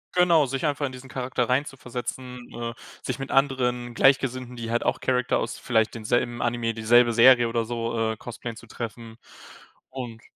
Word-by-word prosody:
Genau, 170 -4 +5
sich 135 +3 -3
einfach 145 0 0
in 130 - -4
diesen 130 +1 -11
Charakter 125 -1 -2
reinzuversetzen, 125 -1 -4
äh, 115 0 -4 0.3
sich 130 - -3
mit 135 0 -6
anderen 125 -3 +1
Gleichgesinnten, 130 -1 +2
die 115 -1 -5
halt 120 +1 0
auch - - +1
Character 125 -1 +1
aus - - -3
vielleicht 110 -3 +1
denselben 120 +2 -1
Anime, 120 -1 0
dieselbe 115 +2 +4
Serie 120 0 +7
oder 115 0 0
so, 115 0 -3
äh, 110 - -6
cosplayen, 115 0 -7
zu 120 - -13
treffen 115 0 -7 0.7
und, 120 -4 -7
120 Hz, 170 wpm, -25 LUFS, 115-130 Hz, 0.7 s, Serie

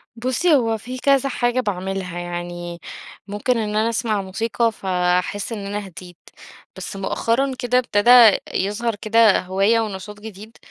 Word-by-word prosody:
بُصّي، 255 +8 +1
هو 225 -4 +1
في 250 +4 -8
كذا 275 +1 +2
حاجة 245 0 0
باعملها. 190 -4 -3
يعني 175 0 -6 0.5
ممكن 210 +5 -1
إن 210 -2 -2
أنا 220 +2 +2
أسمع 220 -3 -1
موسيقى 225 +4 -1
ف 200 - -15
أحِس 180 +3 0
إن 210 -3 -5
أنا 205 0 -4
هِديت. 175 0 -12 0.6
بس 190 +1 -7
مؤخرًا 230 +7 -1
كده 250 0 +1
ابتدا 235 -1 +6
يظهر 210 +4 -1
كده 220 0 +3
هواية 195 +5 +1
ونشاط 210 -1 -5
جديد. 215 +1 -11
210 Hz, 145 wpm, -21 LUFS, 190-230 Hz, 0.6 s, ابتدا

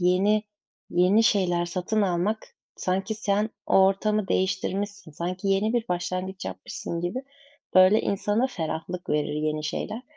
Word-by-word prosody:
yeni 195 +4 +3 0.5
yeni 185 +5 +4
şeyler 180 -5 +2
satın 185 +5 -1
almak 190 +3 +1 0.4
sanki 195 +4 -1
sen 210 +1 0 0.2
o 190 - +6
ortamı 210 +1 +1
değiştirmişsin, 195 0 -1
sanki 180 +5 -3
yeni 195 +3 +2
bir 240 -2 0
başlangıç 185 +1 -3
yapmışsın 95 - -5
gibi, 175 +10 -3 0.5
böyle, 185 +3 +7
insana 210 +5 +1
ferahlık 175 -3 -5
verir 150 0 0
yeni 155 0 -1
şeyler. 215 +9 -3
190 Hz, 130 wpm, -26 LUFS, 175-210 Hz, 0.5 s, böyle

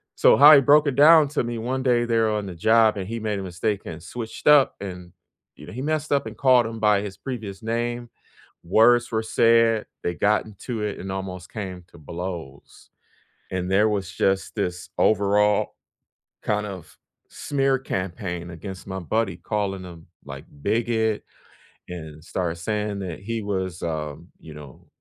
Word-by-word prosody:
So, - - +5
how 150 +2 +10
he 140 - +6
broke 145 +2 +5
it 130 - 0
down 155 0 +7
to 150 -3 -1
me, 120 -1 -4
one 130 +3 -2
day 120 -2 +2
they're 115 -2 +1
on 105 -2 -2
the 90 - -7
job, 110 +4 +4
and 95 -2 -4
he 115 +2 -4
made 105 -2 -2
a 95 - -4
mistake 95 +3 -2
and 80 0 -7
switched 115 +5 -7
up, 145 -2 +6
and 90 -3 -8 0.4
you - - -13
know, - - -9
he 130 +4 -5
messed 155 0 -2
up 140 -3 +2
and 110 0 -7
called 125 0 +4
him 115 0 -6
by 105 -2 +3
his 100 -2 -6
previous 110 -7 -7
name. 120 +1 -3 0.6
Words 120 +6 +4
were 110 0 0
said, 115 0 +3 0.2
they 85 - -1
got 105 +1 +2
into 110 +1 -6
it, 105 - -3
and 95 0 -6
almost 95 -2 -6
came 95 -4 -6
to - - -16
blows, 85 -3 -8 0.6
and 95 0 -3
there 105 +3 +4
was 100 -4 -2
just 95 +2 0
this 90 -3 -3
overall, 105 0 +2 0.7
kind 105 0 -1
of, 95 -5 -9 0.3
smear 135 -2 0
campaign 90 -5 -4
against 90 +3 -8
my 95 0 -4
buddy, 95 0 -1
calling 100 -3 -3
him, 85 -2 -11 0.2
like, 70 -1 -9 0.2
bigot, 110 0 0 0.7
and 80 -3 -9
started 85 -2 -3
saying 105 +3 -3
that 90 -3 -6
he 115 +2 -4
was, 95 -3 -3
um, 80 0 -4
you 80 - -12
know, 75 -3 -13
105 Hz, 175 wpm, -24 LUFS, 90-115 Hz, 0.7 s, how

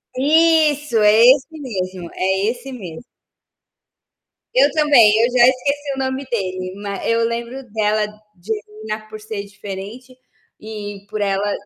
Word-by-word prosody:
Isso! 300 -2 +3
É 210 +1 +5
esse 270 0 +1
mesmo. 185 -8 -5
É 190 +3 0
esse 250 +2 -9
mesmo. 190 -4 -8 1.5
Eu - - +5
também, 285 -9 +5
eu 245 - -2
já 245 -1 +6
esqueci 280 +2 -1
o 270 - -6
nome 265 +1 -2
dele, 185 -4 -3
ma 200 -1 -6
eu 230 0 +2
lembro 235 +3 -5
dela, 215 -1 +1 0.3
Divina, 215 +2 -6
por 215 - -9
ser 210 -1 -6
diferente 205 +5 -9 0.4
e 205 -2 -8
por 215 -1 -4
ela, 200 +1 0
220 Hz, 135 wpm, -19 LUFS, 200-260 Hz, 1.5 s, já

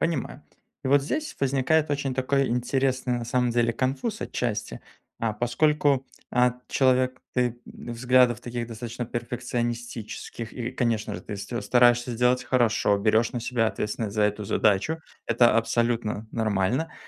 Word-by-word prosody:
Понимаю. 145 -3 -2 0.4
И - - 0
вот 140 +1 +5
здесь 310 - -3
возникает 140 +3 +2
очень 140 -2 -1
такой 135 +1 +1
интересный, 130 +1 0
на 120 - -4
самом 125 +1 +1
деле, 115 0 +2
конфуз 135 - -2
отчасти. 115 -4 -3 0.4
А, 115 -2 0
поскольку, 135 +4 +1 0.2
а, 125 0 +2
человек 130 -1 +2
ты 125 -1 0
в - - -9
взглядов 125 0 +3
таких 120 -1 -4
достаточно 120 +2 -5
перфекционистических, 120 -1 -4
и, 125 -1 -4
конечно 115 -4 -1
же, - - -5
ты 100 - -6
ст 100 - -8
стараешься 120 0 +4
сделать 125 +2 +2
хорошо, 120 -4 +2
берёшь 110 +3 +2
на 120 - -3
себя 115 -1 0
ответственность 105 -1 -3
за 105 - +2
эту 105 0 0
задачу- 105 +12 +1 0.3
это 120 0 +4
абсолютно 115 -2 0
нормально. 110 +6 0
120 Hz, 145 wpm, -26 LUFS, 115-130 Hz, 0.4 s, вот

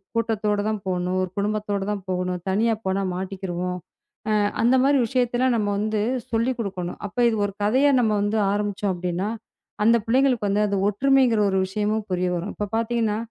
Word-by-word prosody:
கூட்டத்தோடதான் 215 -2 0
போகணும், 180 0 -1
ஒரு 185 - -2
குடும்பத்தோடதான் 205 -1 -2
போகணும், 180 0 -1
தனியா 225 +4 +2
போனா 190 +1 0
மாட்டிக்கிருவோம். 180 -1 -4 0.5
அ, - - +3 0.3
அந்த 245 +3 +4
மாதிரி 280 0 +4
விஷயத்தெல்லாம் 245 0 +1
நம்ம 205 -1 0
வந்து 215 0 0 0.3
சொல்லிக் 235 +3 0
கொடுக்கணும். 185 -5 -4
அப்ப 205 - -17
இது 220 - -1
ஒரு 200 - -4
கதையா 265 +7 +4
நம்ம 220 -3 +2
வந்து 205 +2 0
ஆரம்பிச்சோம் 205 -1 -1
அப்படின்னா, 180 +3 -2 0.5
அந்த 230 +2 +5
பிள்ளைங்களுக்கு 250 -3 +2
வந்து, 205 +1 +2
அந்த 200 -1 -1
ஒற்றுமைங்கிற 250 +1 +3
ஒரு 190 0 +1
விஷயமும் 210 +2 -1
புரிய 180 0 0
வரும். 175 +4 -3
இப்ப 210 - -3
பார்த்தீங்கன்னா, 225 -2 0
210 Hz, 160 wpm, -23 LUFS, 190-230 Hz, 0.5 s, அந்த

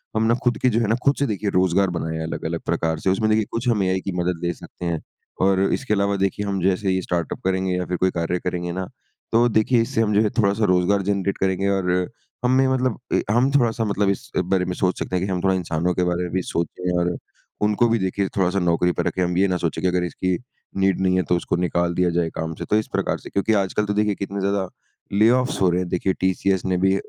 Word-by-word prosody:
हम 110 - +2
ना 115 - +4
खुद 120 -1 +2
की 130 - +4
जो 115 -1 +1
है 115 - +1
ना 110 - +2
खुद 140 0 +4
से 140 - +2
देखिए 105 -2 -2
रोज़गार 95 +1 +3
बनाया 80 -1 -3
है 80 - -3
अलग-अलग 80 0 -4
प्रकार 80 -1 -1
से 95 - 0
उसमें 105 +3 +1
देखिए, 110 0 +2
कुछ 115 +2 -3
हम 105 -4 +2
एआई 95 0 0
की 95 - -4
मदद 90 -1 -1
ले 85 - 0
सकते 85 +3 -10
हैं 85 -2 -1 0.4
और 95 -1 +3
इसके 135 -6 -1
अलावा 100 0 +1
देखिए 95 +1 -1
हम 100 -1 -1
जैसे 95 +1 +1
ये 95 0 0
स्टार्टअप 85 -3 -3
करेंगे 95 0 0
या 90 0 -2
फिर 90 - -2
कोई 95 +1 +2
कार्य 85 +1 -1
करेंगे 90 -1 -3
ना, 95 +2 -3 0.5
तो 115 +2 +4
देखिए 115 +2 +3
इससे 115 +1 0
हम 105 -2 +1
जो 105 - +5
है 105 - +2
थोड़ा-सा 100 +1 +2
रोजगार 90 +2 +2
जनरेट 100 0 -1
करेंगे 95 +1 0
और 95 -2 +1 0.5
हमें 130 +1 +4
मतलब 130 -3 0
ए - - +3
हम 125 +5 +3
थोड़ा-सा 120 -5 +2
मतलब 100 -1 +1
इस 100 - -3
बारे 90 0 +1
में 90 - -2
सोच 90 0 0
सकते 90 - -3
है 90 - 0
की - - -3
हम 90 -1 -1
थोड़ा 95 0 +3
इंसानों 85 0 -1
के 90 - 0
बारे 90 0 0
में 90 - -4
भी 95 - +1
सोचे 90 +2 -2
और 85 0 0 0.4
उनको 105 +3 +3
भी 115 0 +2
देखिए 95 +1 -1
थोड़ा-सा 95 0 +2
नौकरी 90 0 +2
पर - - -2
रखे 95 - -1
हम 90 0 0
ये 100 +2 +4
ना 90 -1 0
सोचे 85 -2 -2
की 95 - +1
अगर 90 0 +1
इसकी 90 +1 -1 0.4
नीड 95 -1 +2
नहीं 95 -1 +2
है 90 - +2
तो 90 - +4
उसको - - -2
निकाल 85 0 0
दिया 90 -1 +2
जाए 85 -2 +1
काम 80 0 -3
से। - - -6
तो - - +1
इस 110 - -1
प्रकार - - 0
से, - - -10
क्योंकि 100 +3 +1
आजकल 100 +1 +1
तो 105 - -1
देखिए 105 0 +1
कितने 100 +1 -4
ज्यादा 100 -1 0 0.5
ले-ऑफ्स 125 +6 +3
हो 95 - +5
रहे 90 +1 +1
हैं 90 - -4
देखिए 90 +2 0
टीसीएस 95 0 +1
ने 95 -1 +1
भी 95 +1 +3
95 Hz, 255 wpm, -22 LUFS, 90-105 Hz, 0.5 s, जो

